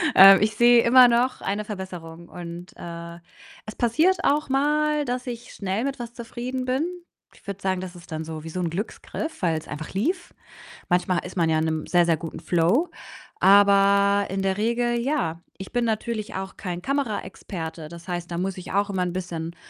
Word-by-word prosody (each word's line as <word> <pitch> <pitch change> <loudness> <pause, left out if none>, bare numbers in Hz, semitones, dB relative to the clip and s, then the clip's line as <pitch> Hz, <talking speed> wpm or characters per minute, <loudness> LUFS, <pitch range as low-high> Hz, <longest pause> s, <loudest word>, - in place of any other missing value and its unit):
Ähm, 195 0 +10
ich 215 0 +1
sehe 240 0 +6
immer 250 +1 +8
noch 240 +2 +1
eine 205 +2 -2
Verbesserung, 175 -5 -8
und, 175 0 -8
äh, 170 0 -8 0.5
es 215 - -8
passiert 315 +11 +2
auch 295 0 +2
mal, 300 +2 +1
dass 250 0 -3
ich 240 -1 -6
schnell 195 +3 -2
mit 275 -1 -3
was 235 -1 -6
zufrieden 245 +2 -5
bin. 260 +5 0 0.5
Ich - - -22
würde 200 -1 -6
sagen, 185 -1 -1
das 185 -1 -7
ist 175 +1 -14
dann 155 0 -3
so 160 -1 -7
wie 165 - -7
so 185 - -5
'n 170 - -1
Glücksgriff, 215 - -5
weil's 160 -3 0
einfach 150 +1 -7
lief. 345 - -2 0.6
Manchmal 180 0 +1
ist 180 +1 -8
man 165 -2 +2
ja 160 -1 +2
in 160 - 0
'nem 160 -1 -2
sehr, 175 -1 +4
sehr 165 -1 +2
guten 165 +1 -7
Flow, 180 - +2 0.5
aber 200 0 +5
in 195 +1 -2
der 190 0 0
Regel 240 +2 +1
ja. 175 - -1 0.2
Ich 190 - -8
bin 245 0 +1
natürlich 220 -1 -2
auch 190 0 -5
kein 180 -3 -5
Kameraexperte. 185 - -4
Das 170 +1 -11
heißt, 175 -1 -4
da 170 - -3
muss 190 +1 -2
ich 180 - -8
auch 200 +1 +1
immer 190 -2 0
'n 180 -1 -2
bisschen, 170 -2 -5
195 Hz, 195 wpm, -24 LUFS, 175-240 Hz, 0.6 s, Ähm